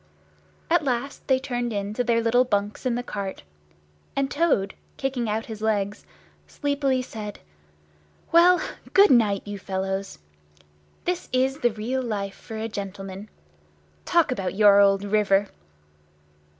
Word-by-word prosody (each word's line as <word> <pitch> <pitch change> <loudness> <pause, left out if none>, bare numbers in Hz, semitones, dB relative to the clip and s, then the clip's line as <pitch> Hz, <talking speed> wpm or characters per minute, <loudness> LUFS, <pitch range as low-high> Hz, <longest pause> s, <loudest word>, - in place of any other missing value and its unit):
At 335 -1 +3
last 265 +1 -3
they 265 - +4
turned 245 -3 -3
in 200 -1 -3
to 245 - 0
their 230 -1 +2
little 245 +2 +4
bunks 205 +1 -1
in 240 - +1
the 245 - -2
cart; 200 -5 -5 0.7
and 275 0 0
Toad, 285 -12 +1 0.2
kicking 260 -4 -2
out 220 +1 -1
his 220 -1 -8
legs, 205 -2 -1 0.4
sleepily 280 -3 0
said, 210 -4 -7 0.9
"Well, 355 +2 +6 0.3
good 400 +1 +7
night, 215 -6 +3
you 205 -1 -6
fellows! 190 +1 -3 0.9
This 360 0 -2
is 265 +2 +1
the 245 - +3
real 230 +4 -2
life 205 -5 -3
for 220 - -9
a 220 +1 -3
gentleman! 195 -1 -7 0.7
Talk 340 -5 +2
about 195 -7 -2
your 205 -1 +6
old 195 0 +4
river!" 205 -1 +2
220 Hz, 135 wpm, -25 LUFS, 200-260 Hz, 0.9 s, good